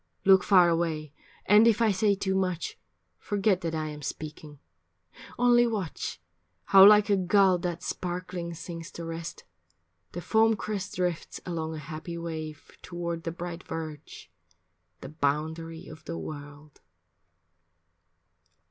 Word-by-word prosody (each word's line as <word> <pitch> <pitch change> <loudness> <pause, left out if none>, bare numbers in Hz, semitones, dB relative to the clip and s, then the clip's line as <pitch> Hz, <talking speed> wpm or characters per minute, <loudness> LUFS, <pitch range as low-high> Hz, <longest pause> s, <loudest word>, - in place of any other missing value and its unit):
Look 190 -1 +6
far 185 -4 +6
away, 160 -3 -1 0.3
and 210 +3 +6
if 225 -1 +4
I 225 -2 +4
say 200 +1 +2
too 190 -1 -1
much, 185 -3 -2 0.4
Forget 200 -2 +1
that 165 -1 -2
I 155 -1 -2
am 150 0 -8
speaking. 150 +1 -7 0.8
Only 240 0 +5
watch, 195 - -4 0.4
How 190 - +7
like 210 0 +6
a - - +5
gull 190 0 +3
that 175 0 -4
sparkling 175 -1 -4
sinks 165 +1 -7
to 170 - -7
rest, 165 0 -6 0.7
The 175 - -4
foam 220 +4 +3
crest 205 -2 -4
drifts 180 -2 -2
along 160 -2 -3
a - - -6
happy 155 +2 -7
wave 160 -2 -7
Toward 170 -1 -5
the 165 - -2
bright 175 0 -6
verge, 155 -2 -8 0.7
the 135 - -8
boundary 160 +3 -2
of 155 - -12
the 165 - -5
world. 145 0 -9
170 Hz, 135 wpm, -28 LUFS, 160-190 Hz, 0.8 s, How